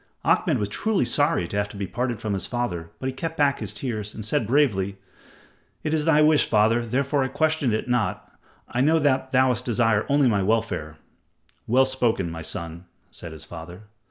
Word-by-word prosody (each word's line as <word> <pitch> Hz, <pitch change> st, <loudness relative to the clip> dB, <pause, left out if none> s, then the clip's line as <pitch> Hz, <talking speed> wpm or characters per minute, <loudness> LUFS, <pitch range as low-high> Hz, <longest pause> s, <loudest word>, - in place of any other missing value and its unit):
Ahmed -, -, +2 dB
was 105 Hz, -, -1 dB
truly 215 Hz, -, 0 dB
sorry 145 Hz, -, +1 dB
to 100 Hz, -, -4 dB
have 100 Hz, 0 st, 0 dB
to 100 Hz, -, -10 dB
be 100 Hz, -, -2 dB
parted 120 Hz, +2 st, -3 dB
from 110 Hz, -2 st, -3 dB
his 95 Hz, -3 st, -2 dB
father, 90 Hz, -10 st, -3 dB
but -, -, -7 dB
he 130 Hz, -, -1 dB
kept 165 Hz, +5 st, -5 dB
back 140 Hz, -1 st, +2 dB
his -, -, -4 dB
tears 110 Hz, -5 st, -4 dB
and 110 Hz, -, -5 dB
said 110 Hz, 0 st, 0 dB
bravely: 105 Hz, -8 st, +1 dB, 0.9 s
"It 155 Hz, -, -1 dB
is 155 Hz, -1 st, +1 dB
thy 155 Hz, -2 st, +5 dB
wish, 155 Hz, -1 st, +4 dB
father, 110 Hz, +2 st, +3 dB
therefore 135 Hz, +4 st, 0 dB
I -, -, 0 dB
question 155 Hz, -3 st, +1 dB
it 110 Hz, +2 st, -1 dB
not. 125 Hz, -2 st, -1 dB, 0.3 s
I 120 Hz, -, -1 dB
know 155 Hz, +4 st, +4 dB
that 135 Hz, -3 st, +1 dB
thou 130 Hz, -1 st, +3 dB
desirest 115 Hz, -2 st, +1 dB
only 140 Hz, -1 st, +4 dB
my 105 Hz, -4 st, +2 dB
welfare." 95 Hz, -7 st, -1 dB, 0.7 s
"Well 130 Hz, +3 st, +4 dB
spoken, 120 Hz, -9 st, 0 dB
my 80 Hz, 0 st, -6 dB
son," 85 Hz, +2 st, -6 dB, 0.3 s
said 85 Hz, -, -9 dB
his 80 Hz, -1 st, -9 dB
father. 85 Hz, +4 st, -10 dB
120 Hz, 195 wpm, -24 LUFS, 100-140 Hz, 0.9 s, thy